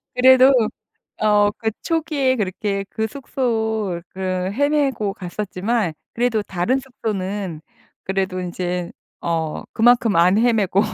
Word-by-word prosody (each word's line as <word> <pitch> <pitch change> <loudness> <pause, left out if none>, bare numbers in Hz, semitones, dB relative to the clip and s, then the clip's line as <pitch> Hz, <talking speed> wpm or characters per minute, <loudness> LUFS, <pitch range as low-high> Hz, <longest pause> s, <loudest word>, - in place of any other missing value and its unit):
그래도 260 +1 +7 0.7
어 210 -1 +4
그 220 -1 -1
초기에 300 -6 0
그렇게 200 0 -2
그 220 0 -2
숙소를 205 -7 -2
헤매고 280 -7 +1
갔었지만 200 +1 -2 0.2
그래도 230 -3 +1
다른 190 +8 0
숙소는 200 - -4 0.4
그래도 190 -1 -1
인제 180 0 -3 0.3
어 165 -2 -2
그만큼 230 -3 +4
안 180 +5 +5
헤매고. 215 -5 +3
210 Hz, 235 characters per minute, -21 LUFS, 185-245 Hz, 0.7 s, 그래도